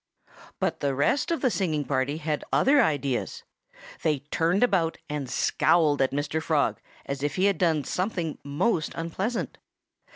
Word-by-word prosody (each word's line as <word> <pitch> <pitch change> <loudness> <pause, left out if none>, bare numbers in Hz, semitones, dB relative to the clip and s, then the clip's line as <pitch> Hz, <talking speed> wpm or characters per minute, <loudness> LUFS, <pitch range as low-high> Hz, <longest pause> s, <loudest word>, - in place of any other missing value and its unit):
But - - -1
the 140 -1 0
rest 150 - +1
of 335 - -1
the 255 - +2
singing 155 -8 -1
party 135 +2 0
had 155 -1 -2
other 280 +1 +5
ideas. 140 - -1 0.6
They 150 -4 +1
turned 170 +6 +2
about 180 -9 +2
and 145 -4 -3
scowled 150 +1 +2
at 135 - +3
Mr. 145 +3 -2
Frog 155 -3 0 0.2
as 140 0 -4
if 145 0 -1
he 185 - +2
had 200 -4 +2
done 160 -5 +2
something 180 - -2
most 155 +5 0
unpleasant. 190 +8 -3
160 Hz, 155 wpm, -26 LUFS, 145-185 Hz, 0.6 s, other